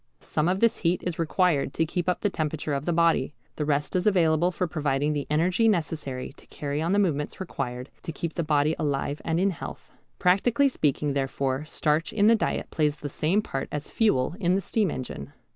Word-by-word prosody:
Some 150 - -1
of 190 +2 0
this 230 -1 +4
heat 175 0 0
is 175 -2 -3
required 165 -4 +1
to 165 - +2
keep 175 +2 -2
up 180 - -1
the 205 - +2
temperature 155 -2 -2
of 140 +3 -3
the - - +2
body. 165 -4 +2 0.2
The 150 - -1
rest 145 +2 0
is 185 +2 +1
available 170 -3 +3
for 180 0 -1
providing 150 -3 0
the 145 -2 -3
energy 180 +9 +2
necessary 155 -10 -1
to - - -17
carry 145 +1 -3
on 165 +2 0
the 200 - +3
movements 155 -8 0
required 130 -8 -5
to 165 - -5
keep 165 +1 -4
the 170 - -1
body 150 0 +2
alive 145 -1 -1
and 165 0 0
in 195 +2 +3
health. 170 - -8 0.3
Practically 235 +9 +3
speaking 145 - 0
therefore 135 0 -1
starch 155 +1 0
in 205 -1 +3
the 230 +2 +7
diet 220 - -2
plays 150 -2 +1
the 150 -1 -6
same 175 +9 +1
part 135 -8 -4
as 150 0 -5
fuel 170 - +2
in 180 -2 +2
the 195 - +1
steam 205 +1 0
engine. 125 - -6
160 Hz, 210 wpm, -26 LUFS, 145-180 Hz, 0.3 s, the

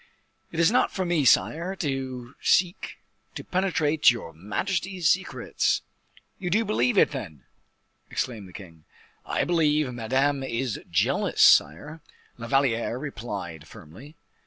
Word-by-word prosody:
"It 165 - -5
is 170 +4 +4
not 250 - +2
for 190 - -2
me, 170 -5 +1
sire, 170 +9 +2
to 130 -5 -4
seek 180 -1 +1 0.4
to - - -6
penetrate 160 -5 +2
your 115 -9 -3
majesty's 175 - -2
secrets." 185 +4 0 0.6
"You 180 - -3
do 220 +6 +2
believe 215 +2 +1
it, - - +5
then?" 95 - -7 0.7
exclaimed 115 -7 -4
the - - -14
king. 85 -5 -13 0.4
"I - - 0
believe 150 -5 +1
Madame 135 +4 0
is 125 -3 -3
jealous, 85 - +1
sire," 150 - +4 0.4
La 115 - -6
Valliere 120 -3 +1
replied, 100 - -7
firmly. 115 - -14
135 Hz, 130 wpm, -25 LUFS, 115-170 Hz, 0.7 s, it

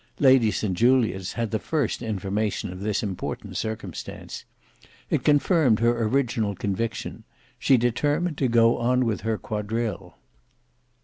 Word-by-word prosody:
Lady 130 -5 +5
St 105 -2 -1
Julians 110 -4 +2
had 115 -2 -2
the 110 - 0
first 150 -9 -1
information 105 -3 -2
of 90 - -9
this 105 +2 -1
important 95 -4 -5
circumstance; 110 -1 -6 0.7
it - - +1
confirmed 145 - +4
her 120 0 +2
original 115 -4 0
conviction: 105 +4 -3 0.4
she 135 - +4
determined 145 +7 0
to 135 - +2
go 115 0 +4
on 125 +1 +2
with 115 -2 -1
her 110 0 -1
quadrille. 105 -4 -4
115 Hz, 130 wpm, -25 LUFS, 105-125 Hz, 0.7 s, Lady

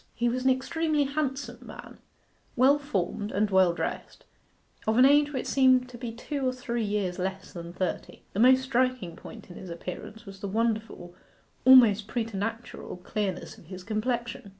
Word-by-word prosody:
He 240 - 0
was 255 +2 -2
an - - +5
extremely 300 +3 +1
handsome 275 -3 -3
man, - - -11 0.6
well 270 +4 +5
formed, 205 -6 -3
and 205 +1 0
well 190 -2 +5
dressed, 170 - -5 0.6
of 220 +1 +2
an 255 - +7
age 290 +1 +5
which 260 -3 -3
seemed 260 -2 +4
to 245 - -10
be 240 -2 -5
two 275 +5 -5
or - - +2
three 245 -2 -3
years 200 -3 -2
less 190 0 -4
than 170 -1 -7
thirty. 185 0 -4
The 200 - -3
most 260 +2 +6
striking 255 -8 0
point 180 - -12
in - - -10
his 185 - -9
appearance 185 +6 -8
was 195 -1 -11
the 200 - -4
wonderful, 220 -4 -2 0.5
almost 230 -6 +7
preternatural, 225 -2 -4
clearness 190 0 -4
of - - -18
his 185 +2 -9
complexion. 230 +1 -3
230 Hz, 170 wpm, -27 LUFS, 195-255 Hz, 0.6 s, an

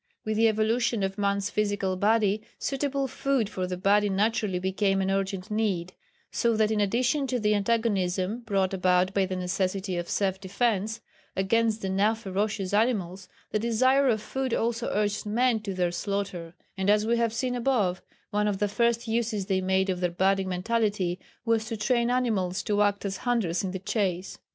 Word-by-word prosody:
With 215 0 -1
the 225 +1 +5
evolution 225 +1 +1
of 195 +1 -2
man's 200 0 0
physical 205 -3 0
body, 210 +1 +2 0.2
suitable 275 0 -1
food 265 -3 0
for 185 -1 -2
that 180 0 -5
body 205 +1 +4
naturally 205 -1 +1
became 195 +1 0
an 190 0 0
urgent 195 +1 -2
need, 195 -5 -1 0.4
so 235 -2 +1
that 215 0 +2
in 215 -1 +1
addition 250 +7 +1
to 255 -1 -1
the 210 -1 +2
antagonism 200 -2 0
brought 195 -5 0
about 185 0 +2
by 195 -1 +2
the 185 - -3
necessity 185 +1 -1
of 175 0 -4
self 190 -1 0
defence 215 +2 -1 0.3
against 220 +3 +1
the 190 - -1
now 205 +4 +2
ferocious 205 -2 -2
animals, 195 -5 0 0.2
the 215 - +1
desire 255 +5 +3
of 215 -3 0
food 265 0 -2
also 235 +1 -1
urged 205 0 -1
men 235 +2 +2
to 210 -2 -5
their 180 -1 +1
slaughter, 180 -2 -3 0.2
and 190 0 -1
as 210 +1 +4
we 235 +1 +2
have 230 -1 +1
seen 245 +2 -1
above, 230 -8 +1 0.3
one 210 0 +1
of 205 -2 0
the 205 - +1
first 235 +3 +1
uses 225 -3 -1
they 190 -1 0
made 190 +1 +1
of 180 - -3
their 180 -1 +1
budding 190 +2 +1
mentality 195 -2 0 0.3
was 225 -1 +1
to 225 0 -4
train 235 +2 +1
animals 215 -7 0
to 210 -2 +1
act 205 0 +1
as 195 -1 -2
hunters 215 -9 0
in 190 - -2
the 190 - -4
chase. 190 -1 -2
205 Hz, 185 wpm, -27 LUFS, 190-230 Hz, 0.4 s, the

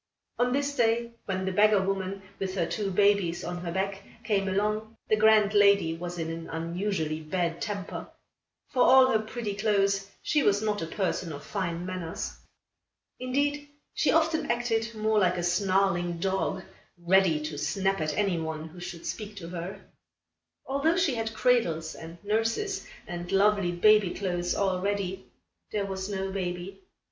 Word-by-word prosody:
On 245 0 +3
this 285 +2 0
day, 235 0 +2
when 190 -1 -2
the 190 - 0
beggar 210 +2 +5
woman, 195 0 -2 0.2
with 190 -1 -3
her 175 -3 +1
two 195 +4 -2
babies 195 -3 +2
on 175 0 -4
her 175 -1 -4
back, 195 +2 -2 0.2
came 200 -3 +1
along, 210 +3 -1
the 215 - +4
grand 215 -1 +5
lady 200 -5 +5
was 175 +1 -6
in 165 -1 -3
an 165 0 -6
unusually 165 -1 -2
bad 170 +1 -2
temper. 200 -2 -4 0.6
For 255 - +1
all 260 0 +7
her 220 - +3
pretty 220 -1 -4
clothes, 200 -1 +1 0.2
she 300 - +2
was 205 -5 +3
not 210 -1 -1
a 165 - -3
person 180 -2 -2
of 145 -1 -7
fine 175 -3 -3
manners. 185 -3 -4 0.9
Indeed, 285 +3 -1 0.2
she - - +2
often 320 0 +2
acted 230 -1 0
more 215 0 +2
like 180 -2 +2
a 175 - -2
snarling 180 -1 +1
dog, 190 +1 -1 0.3
ready 175 -2 +3
to 150 -1 -5
snap 195 +5 0
at 155 -1 -2
any 195 -5 +1
one 160 0 -4
who 175 +3 -12
should 175 -1 -7
speak 210 -1 -5
to 170 -4 -8
her. 175 +2 -6 0.8
Although 280 +5 +1
she 335 -7 +2
had 225 -1 -3
cradles 170 -12 +2
and 165 +1 -10
nurses 225 - -1 0.2
and 175 0 -6
lovely 200 -2 +3
baby 205 +1 +4
clothes 175 -3 -1
all 190 -2 0
ready, 195 -1 -2 0.4
there 205 -2 -1
was 190 0 -4
no 195 -1 -2
baby. 180 - -4
195 Hz, 165 wpm, -28 LUFS, 175-215 Hz, 0.9 s, all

